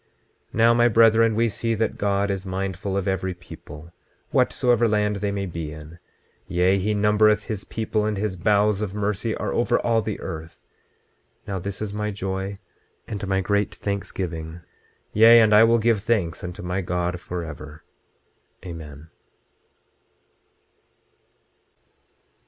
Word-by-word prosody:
26:37 - - -42 0.5
Now 115 +2 +5
my 120 0 +4
brethren, 115 0 +5
we 115 +1 +2
see 115 +1 -2
that 110 +1 -1
God 100 0 +1
is 95 -1 -3
mindful 95 0 -3
of 100 - -2
every 95 -1 -1
people, 85 -2 -12 0.4
whatsoever 120 -2 +2
land 105 -1 +1
they 100 +1 -2
may 100 -1 -2
be 85 -4 -5
in; 80 +2 -11 0.5
yea, 90 +2 +2
he 105 +3 0
numbereth 105 +1 +3
his 105 -3 -5
people, 110 -1 -2
and 105 -2 -2
his 100 -1 -2
bowels 105 +2 +2
of 105 -2 -3
mercy 105 +2 -1
are - - -3
over 120 - +2
all 115 -1 +2
the 110 -2 -4
earth. 80 +1 -8 0.8
Now 95 -2 -3
this 100 +3 -5
is 105 -1 -5
my 105 0 -2
joy, 95 0 -4 0.5
and 100 -2 -5
my 95 0 +1
great 100 +2 0
thanksgiving; 85 -5 -4 0.5
yea, 115 +2 +8
and 110 -2 +5
I 105 +1 +8
will 115 +1 +4
give 115 -2 +2
thanks 105 -7 -1
unto 90 -1 -6
my 90 +2 -2
God 90 0 -2
forever. 80 -4 -7 0.8
Amen. 80 -3 -9
100 Hz, 145 wpm, -24 LUFS, 90-105 Hz, 0.8 s, yea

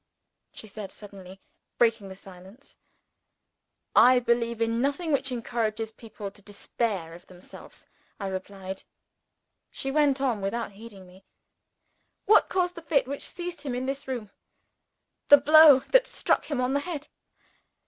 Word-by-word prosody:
she - - -10
said, 210 -1 -9
suddenly 195 -2 -12 0.4
breaking 225 -4 +1
the 190 - -9
silence. 190 +6 -15 1.2
"I 255 +1 +7
believe 235 -1 0
in 230 +1 0
nothing 285 +5 -1
which 270 -2 0
encourages 225 -2 -3
people 215 -3 -9
to 205 - -18
despair 200 -3 -4
of 175 +1 -14
themselves," 180 -1 -13 0.3
I 200 - -5
replied. 190 0 -6 0.9
She 270 - -5
went 285 -2 +2
on 250 -6 -1
without 225 +3 -3
heeding 200 -2 -13
me. 185 +1 -18 1.0
"What 425 +2 +5
caused 360 -1 0
the 335 - -10
fit 290 -4 +1
which 280 +1 -5
seized 350 -1 -7
him 270 -4 -4
in 250 +1 -3
this 275 +1 -5
room? 240 -6 -5 1.0
The 290 - +10
blow 295 -1 +7
that - - +5
struck - - 0
him 285 -4 -3
on 255 +1 0
the 285 - +2
head. 305 -2 -6
235 Hz, 145 wpm, -26 LUFS, 200-280 Hz, 1.2 s, The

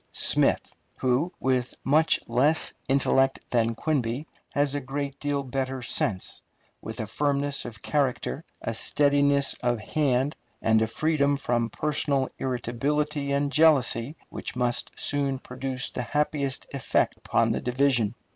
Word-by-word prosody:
Smith, - - +2 0.2
who, 130 +7 +1
with 130 -1 0
much 155 +4 +3
less 140 +7 +2 0.2
intellect 135 0 +3
than 115 -1 +2
Quinby, 130 -1 -1 0.3
has 145 -1 +1
a 145 - -1
great 140 +1 -4
deal 145 -1 -1
better 130 0 -3
sense, 100 -5 -1 0.4
with 110 +1 -7
a 110 - -2
firmness 140 +4 -1
of 110 -4 -9
character, 145 +1 -1 0.2
a 115 - -2
steadiness 140 +3 +3
of 120 -2 +1
hand, 135 +3 0 0.2
and 110 0 +3
a 110 - +2
freedom 145 +2 +1
from 120 -3 0
personal 140 0 0
irritability 140 +4 -1
and 140 0 +1
jealousy 140 -3 +3
which - - -6
must 125 -1 0
soon 140 -2 0
produce 130 0 -4
the - - -3
happiest 140 +1 -1
effect 135 -5 +1
upon - - +1
the - - -1
division. 125 -3 +2
135 Hz, 135 wpm, -26 LUFS, 125-145 Hz, 0.4 s, much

